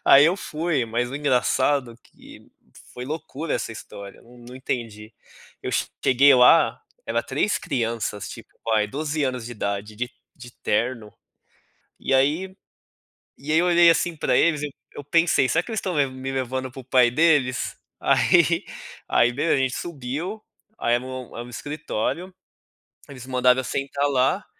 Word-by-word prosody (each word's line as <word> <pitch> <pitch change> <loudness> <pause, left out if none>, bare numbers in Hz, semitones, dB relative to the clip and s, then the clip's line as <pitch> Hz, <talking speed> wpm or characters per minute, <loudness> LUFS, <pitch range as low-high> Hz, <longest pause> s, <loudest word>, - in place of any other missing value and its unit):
Aí, 140 +2 +8
eu 175 +4 +3
fui, 155 -6 -1
mas 120 +2 -2
o 135 - -4
engraçado 130 -2 +1
que - - -17 0.4
foi 125 - -6
loucura 155 +1 -5
essa - - -3
história, 100 -2 -11
num 120 +1 -14
entendi. 115 -4 -5 0.5
Eu - - -3 0.3
cheguei 135 +2 +6
lá, 125 +6 +5 0.2
era - - -1
3 210 - 0
crianças 115 -5 -3
tipo, - - -11 0.2
aí 105 -1 +3
12 150 +6 -3
anos 125 -3 -3
de 120 - -6
idade, 105 0 -4
de 125 +1 -3 0.3
de 120 -2 -12
terno, 115 0 -2 0.9
e - - -3
aí 155 +8 +1 0.8
e 150 +2 -4
aí 160 - +4
eu 175 - +3
olhei 175 -1 +6
assim 165 0 +1
pra - - +1
eles, 155 -3 +3
eu 150 - -3 0.2
eu 145 - -9
pensei: 165 -2 +3
"Será 165 - +2
que 235 - -11
eles 220 - -2
estão 185 -3 -2
levan 140 -3 +1
me 130 +1 -5
levando 130 0 -3
para 135 - -10
o 125 - -14
pai 125 -2 +4
deles?" 140 -3 +2 0.2
Aí - - +3 0.4
aí 120 +1 +3
beleza, 145 +6 +1
a - - +2
gente 130 -1 0
subiu, 165 - -5 0.4
aí 120 - +1
era 120 - -5
um 130 -1 -7
um 120 +1 -7
escritório, 150 - -4 0.8
eles 130 -2 -10
mandaram 125 0 +3
eu - - -2
sentar 140 +2 -1
lá, 135 +9 +1
130 Hz, 165 wpm, -23 LUFS, 120-155 Hz, 0.9 s, Aí